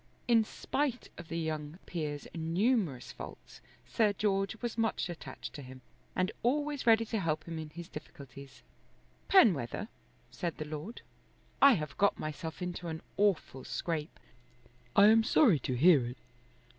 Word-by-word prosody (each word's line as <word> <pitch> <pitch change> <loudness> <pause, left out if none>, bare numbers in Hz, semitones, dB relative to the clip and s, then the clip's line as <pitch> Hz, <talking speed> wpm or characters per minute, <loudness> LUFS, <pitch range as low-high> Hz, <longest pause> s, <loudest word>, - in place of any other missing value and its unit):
In 230 -2 +5
spite 260 +3 -2
of 170 - -9
the 165 - -4
young 155 -1 -3
peer's 150 -4 -4
numerous 170 - 0
faults - - -11 0.2
Sir 215 -3 +2
George 195 0 0
was 240 -2 -3
much 225 -5 0
attached 170 - -8
to 145 - -7
him, 130 -1 -11 0.3
and 185 +3 +1
always 290 +2 0
ready 225 0 +6
to 220 0 -2
help 160 -4 -1
him 165 -1 -6
in 155 -1 -6
his 170 +2 -9
difficulties. 140 -2 -11 0.6
"Penwether," 210 - +4 0.4
said 175 -3 -4
the 155 - -4
Lord, 155 +9 -7 0.6
"I 275 -1 +9
have 150 - -3
got 200 +1 +3
myself 160 +3 -5
into 180 -1 -4
an 160 +1 -5
awful 190 -10 +1
scrape." 160 -3 -4 0.8
"I 200 - +8
am 225 +1 +6
sorry 220 - +5
to 130 0 -2
hear 150 0 +6
it. 125 +2 -7
175 Hz, 150 wpm, -32 LUFS, 150-220 Hz, 0.8 s, I